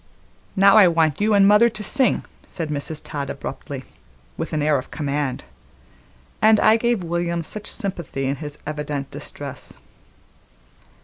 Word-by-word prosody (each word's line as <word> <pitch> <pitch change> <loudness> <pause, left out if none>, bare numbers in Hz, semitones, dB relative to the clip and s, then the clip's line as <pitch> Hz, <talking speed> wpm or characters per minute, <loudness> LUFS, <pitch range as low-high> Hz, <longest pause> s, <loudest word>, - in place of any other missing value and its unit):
"Now 195 +1 +6
I 205 -4 +8
want 165 -1 +2
you 210 0 +3
an' 200 -1 +6
mother 210 +4 +6
to 215 -2 -7
sing," 260 +5 +1 0.2
said 165 -3 -4
Mrs. 150 +1 -3
Todd 145 -3 -5
abruptly, - - -6 0.5
with 165 - -5
an 155 -2 -1
air 150 -2 +3
of 130 - -10
command, 145 -3 -2 1.0
and 215 0 +6
I 215 - +5
gave 235 -3 0
William 170 0 -1
much 215 -1 -6
sympathy 170 - -3
in 135 +1 -1
his 150 -1 -7
evident 150 -2 -4
distress. - - -7
165 Hz, 145 wpm, -22 LUFS, 150-210 Hz, 1.0 s, I